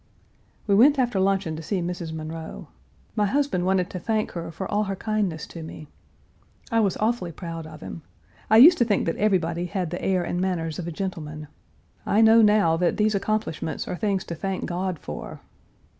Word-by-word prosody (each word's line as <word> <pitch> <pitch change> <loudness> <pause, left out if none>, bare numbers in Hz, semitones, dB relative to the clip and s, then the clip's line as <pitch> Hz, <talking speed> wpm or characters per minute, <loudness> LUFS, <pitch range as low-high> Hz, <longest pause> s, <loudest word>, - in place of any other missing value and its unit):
We 200 - +2
went 275 +8 +6
after 245 -6 +1
luncheon 190 -4 +1
to - - -6
see 190 +4 -2
Mrs. 175 -2 -4
Munroe. 160 0 -7 0.5
My 210 -2 +2
husband 265 -8 0
wanted 190 -1 +1
to 185 - -5
thank 215 +3 -1
her 170 -1 -5
for 190 - -5
all 210 +1 0
her 195 0 -3
kindness 200 -7 -2
to 170 - -8
me. 155 -1 -9 0.8
I 230 - +3
was 200 -4 +1
awfully 215 -5 0
proud 165 -1 -7
of 155 -1 -12
him. 165 - -7 0.5
I 220 - +6
used 325 +9 +9
to - - +6
think 210 -4 +1
that 165 - -1
everybody 175 -4 +1
had 180 -3 -3
the 180 - -4
air 185 -2 +1
and 175 - -2
manners 170 -4 -2
of 170 - -4
a - - -3
gentleman. 155 -4 -5 0.5
I 215 - +2
know 225 +1 +7
now 210 -6 +4
that 175 0 +1
these 215 0 +2
accomplishments 200 -6 -2
are - - -3
things 195 -1 -1
to 170 - -6
thank 190 +3 -3
God 185 0 -2
for. 75 - -8
185 Hz, 195 wpm, -25 LUFS, 165-210 Hz, 0.8 s, used